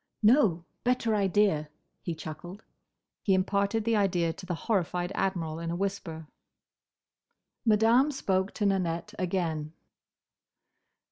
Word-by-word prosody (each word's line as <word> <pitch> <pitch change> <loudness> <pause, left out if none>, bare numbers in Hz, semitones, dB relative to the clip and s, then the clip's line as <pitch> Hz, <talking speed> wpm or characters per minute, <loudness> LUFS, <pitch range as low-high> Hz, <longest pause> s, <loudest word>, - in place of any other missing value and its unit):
"No! 210 - +4 0.2
Better 245 -2 +1
idea!" 195 -6 +2 0.3
he 170 - -4
chuckled. 175 +6 -8 0.6
He 195 - +3
imparted 200 +3 +1
the 230 -1 +2
idea 180 -5 +1
to 185 +2 -11
the 175 - -1
horrified 180 -4 0
Admiral 170 -5 -1
in 165 0 -4
a 170 - -2
whisper. 180 -4 -3 1.4
Madame 225 +5 +5
spoke 190 -8 0
to 210 - 0
Nanette 185 0 0
again. 165 -4 -1
190 Hz, 115 wpm, -29 LUFS, 170-210 Hz, 1.4 s, Madame